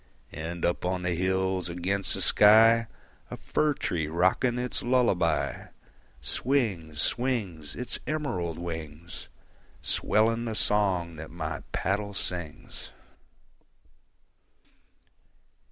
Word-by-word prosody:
And 80 +3 -4
up 85 - 0
on 90 0 -1
the 90 -1 0
hills 95 0 0
against 95 +3 -2
the - - -2
sky, 115 +2 +6 0.4
A - - -6
fir 150 -1 0
tree 80 - -1
rocking 95 +9 +2
its 125 0 -2
lullaby, 120 -7 +1 0.6
Swings, 95 - -1
swings, 100 - -1
Its 125 +1 -4
emerald 110 - -2
wings, 85 -1 -7 0.5
Swelling 115 +2 +2
the 110 -2 -3
song 95 -6 +1
that 80 +1 -8
my 80 -1 -4
paddle 100 +2 -1
sings. 85 -5 -6
95 Hz, 100 wpm, -28 LUFS, 85-115 Hz, 0.6 s, sky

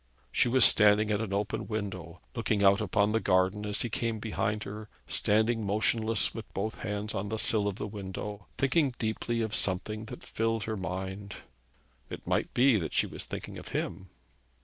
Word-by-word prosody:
She - - +3
was 125 0 +7
standing 105 0 +5
at 105 +1 +1
an 110 -3 -3
open 100 +2 -2
window, 95 -6 -5
looking 110 -4 0
out 100 +2 +5
upon 105 0 +2
the 110 - +2
garden 95 +2 +2
as 105 0 0
he 120 - -2
came 115 0 -1
behind 105 -1 -2
her, 105 +1 -7 0.2
standing 110 +2 +2
motionless 110 +2 +1
with 110 -4 -8
both 110 +3 -3
hands 105 +1 -3
on 100 0 -3
the 110 - -2
sill 105 -1 +3
of 100 - -2
the - - -4
window, 100 0 -6
thinking 135 -1 +2
deeply 115 +1 -1
of 110 -1 -2
something 105 +3 0
that - - -9
filled 115 -1 -1
her 110 - -3
mind. 95 +2 -5 0.7
It - - -8
might - - 0
be 125 -1 +5
that 85 -5 -3
she - - +3
was - - -5
thinking - - -6
of - - -10
him. 95 +2 -4
105 Hz, 185 wpm, -30 LUFS, 100-110 Hz, 0.7 s, was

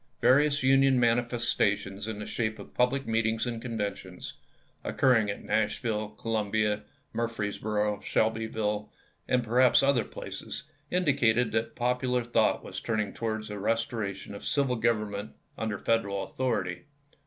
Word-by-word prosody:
Various 145 +1 +4
Union 135 0 +5
manifestations 115 -4 +1
in 110 -2 -4
the 105 - -5
shape 110 -2 -2
of - - -11
public 130 +2 +1
meetings 115 0 +1
and 115 -2 -3
conventions, 100 -6 -4 0.5
occurring 115 -6 +3
at 100 - -4
Nash^dlle, 110 0 -1
Columbia, 105 -1 0 0.3
Murfreesboro, 105 -2 -1
Shelby 110 0 +1
ville, 105 -1 -2 0.4
and 125 -1 +2
perhaps 125 +3 +5
other 135 -4 +3
places, - - -6 0.3
indicated 130 -9 +2
that 110 +1 -1
popular 125 0 +1
thought 120 - +2
was - - -5
turning 110 -3 -1
towards 110 -2 -3
a 105 - -5
restoration 110 -2 -2
of 100 - -8
civil 140 -3 +1
government 110 -2 -1 0.2
under 110 -2 -2
Federal 100 -4 0
authority. 95 -7 -2
115 Hz, 130 wpm, -29 LUFS, 105-125 Hz, 0.5 s, Union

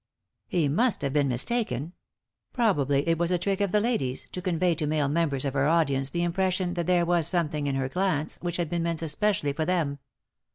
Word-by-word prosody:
He 165 -5 +1
must 205 - +1
hare 140 - 0
been 145 0 +2
mistaken; 145 - -1 0.6
probably 145 - +1
it 165 -1 +2
was 170 0 +1
a 180 - +2
trick 195 +3 -1
of 200 -3 +1
the 210 - +3
lady's, 205 - -1
to 180 - -5
convey 180 -1 +1
to 155 -2 -3
male 150 -1 +1
members 145 -3 0
of 135 - -1
her 140 0 +2
audience 140 -5 +2
the 170 +3 -1
impression 180 +1 0
that 170 -2 -3
there 175 -1 +3
was 170 -2 +2
something 155 -4 -1
in 140 - 0
her 135 -1 -1
glance 175 -1 -1
which 175 -1 -2
had 175 -2 -1
been 170 -1 0
meant 165 -1 -2
especially 160 -2 0
for 160 - -1
them. 155 -5 0
165 Hz, 210 wpm, -27 LUFS, 145-180 Hz, 0.6 s, the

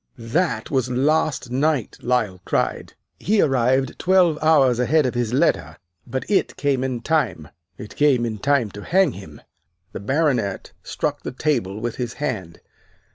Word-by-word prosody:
"'That 140 +13 -1
was 130 -3 0
last 135 0 0
night!' 140 -2 0
Lyle 115 -7 -1
cried. - - -2 0.3
'He 215 +1 +1
arrived 130 -2 +1
twelve 180 -4 +3
hours 140 -6 +4
ahead 150 +4 +3
of 125 - -1
his 120 -2 -1
letter 130 - +1 0.3
but 130 +2 -4
it 205 - 0
came 140 -3 0
in 130 -3 -3
time 115 - -1 0.3
it 105 - -10
came 135 -5 +3
in 110 -2 -4
time 140 -3 +1
to 105 - -9
hang 190 +1 +3
him!'" 80 -7 -11 0.5
The - - -6
Baronet 125 -4 -1
struck - - -3
the - - -5
table 125 -8 -1
with 120 +1 -4
his 120 -2 -3
hand. 105 - -5
130 Hz, 155 wpm, -22 LUFS, 115-150 Hz, 0.5 s, hours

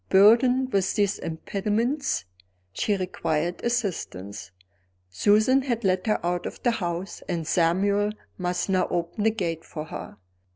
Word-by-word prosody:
Burdened 245 +6 +5
with 195 -1 +1
these 205 -2 +1
impediments, 210 - -1 0.5
she 205 - 0
required 175 -2 -2
assistance. 165 - -3 0.6
Susan 215 - +4
had 240 -3 -2
let 185 +1 +1
her 215 - +2
out 175 0 -1
of - - -9
the 240 - +4
house; 180 -3 -3
and 170 -3 -1
Samuel 195 +6 +2 0.3
must 180 -1 -1
now 185 -2 +2
open 175 +5 -2
the - - +6
gate 170 -7 -3
for 155 -1 -7
her. 130 - -8
195 Hz, 135 wpm, -26 LUFS, 170-220 Hz, 0.6 s, the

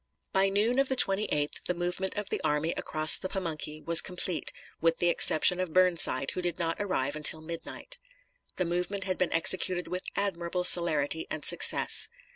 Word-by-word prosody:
By 195 0 +1
noon 215 +6 -1
of 275 - 0
the 265 - 0
28th 195 - 0
the 180 - -2
movement 180 +2 -4
of 205 -1 -6
the - - -4
army 150 +3 -2
across 155 -2 +1
the 185 - -6
Pamunkey 155 -5 -6
was 170 0 +6
complete, 180 -2 -4 0.3
with 165 0 +1
the 175 - 0
exception 175 +2 +3
of 185 -4 -5
Burnside, 170 -7 +1
who 180 - -5
did 175 -1 -4
not 165 -1 -3
arrive 150 -9 -3
until 155 +1 +3
midnight. 170 - -9 0.6
The 180 - -2
movement 180 +3 -3
had 185 -1 -5
been 185 - -1
executed 180 +2 +2
with 180 0 -6
admirable 180 -3 -3
celerity 160 -3 +3
and 155 - -6
success. - - +5
175 Hz, 175 wpm, -27 LUFS, 160-190 Hz, 0.6 s, was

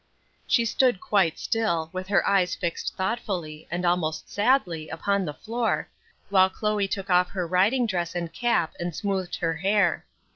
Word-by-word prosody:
_" - - -42 0.4
She 235 - +3
stood 245 -2 +2
quite 185 -6 +1
still, 170 -9 -1
with 185 0 -4
her 200 0 +2
eyes 190 -2 +2
fixed 170 -3 -3
thoughtfully, 185 -7 -3
and 175 +2 -2
almost 165 -3 0
sadly, 205 - +1
upon 200 +4 0
the 150 - -4
floor, 230 +1 -2 0.4
while 190 -1 +5
Chloe 210 0 -1
took 195 0 -4
off 180 0 +4
her 185 -3 -3
riding 195 +9 +2
dress 175 -5 -2
and 170 -2 -3
cap 235 -9 +1
and 175 -2 -3
smoothed 195 -3 -2
her 165 -2 -1
hair. 195 +1 +1
185 Hz, 170 wpm, -26 LUFS, 170-205 Hz, 0.4 s, while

